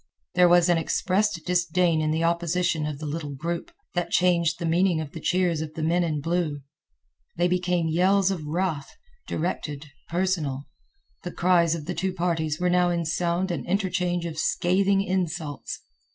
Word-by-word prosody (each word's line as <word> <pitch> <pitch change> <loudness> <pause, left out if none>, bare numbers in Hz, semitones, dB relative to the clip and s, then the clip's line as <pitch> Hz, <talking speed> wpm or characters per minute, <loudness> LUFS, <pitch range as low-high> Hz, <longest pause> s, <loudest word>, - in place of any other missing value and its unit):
There 180 0 +5
was 175 0 +5
an 175 -2 +3
expressed 185 +1 0
disdain 175 -2 +2
in 155 - 0
the 160 +2 0
opposition 170 -1 0
of 150 -2 -4
the 155 - -7
little 145 -1 -4
group, 170 +5 -4 0.2
that 175 -1 -1
changed 170 -2 +2
the 170 - -4
meaning 170 +1 +2
of 155 -2 -5
the 160 - -7
cheers 175 -1 +1
of 155 -1 -6
the 160 - -3
men 170 +3 +2
in 155 -3 -1
blue. 165 -2 -1 0.8
They 175 +1 +3
became 180 -2 0
yells 190 +4 +3
of 175 -5 -4
wrath, 160 -3 -2 0.3
directed, 150 -3 -3 0.2
personal. 165 -6 -1 0.6
The 175 - -6
cries 170 -2 +3
of 155 -3 -6
the 180 - -3
two 185 +1 -2
parties 165 -4 -1
were 180 - +1
now 180 0 +3
in 170 -1 -1
sound 175 +3 0
an 155 -7 -3
interchange 180 -2 0
of 160 -2 -5
scathing 195 +4 +2
insults. 175 -6 -3
170 Hz, 170 wpm, -25 LUFS, 160-180 Hz, 0.8 s, There